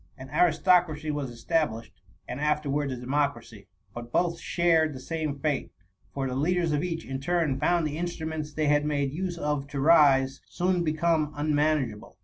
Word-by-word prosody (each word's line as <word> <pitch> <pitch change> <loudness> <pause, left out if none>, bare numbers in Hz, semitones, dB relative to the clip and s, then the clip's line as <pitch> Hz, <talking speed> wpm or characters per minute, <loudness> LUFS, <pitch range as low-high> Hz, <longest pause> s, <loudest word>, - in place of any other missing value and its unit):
An 130 0 -10
aristocracy 165 -1 +3
was 145 -3 -3
established, 120 -1 -2 0.3
and 125 - -5
afterwards 150 -1 0
a - - -3
democracy; 125 -5 -2 0.3
but 120 +1 -8
both 170 +2 +1
shared 165 -4 +2
the - - -7
same 155 +1 -3
fate; 145 -1 -1 0.4
for 135 -1 -3
the 130 - -4
leaders 165 +4 +1
of 145 -1 +1
each^ 165 -2 -3
in 135 0 -4
turn, 155 -2 0
found 170 +2 +2
the 150 0 -3
instrufhents 160 -3 -4
they 155 - 0
had 145 0 +3
made 145 -2 0
use 175 +1 -3
of 150 -3 -2
to 140 0 -5
rise, 135 -3 +4
soon 180 0 0
become 155 -1 +1
unmanageable. 145 -7 0
150 Hz, 165 wpm, -27 LUFS, 135-165 Hz, 0.4 s, rise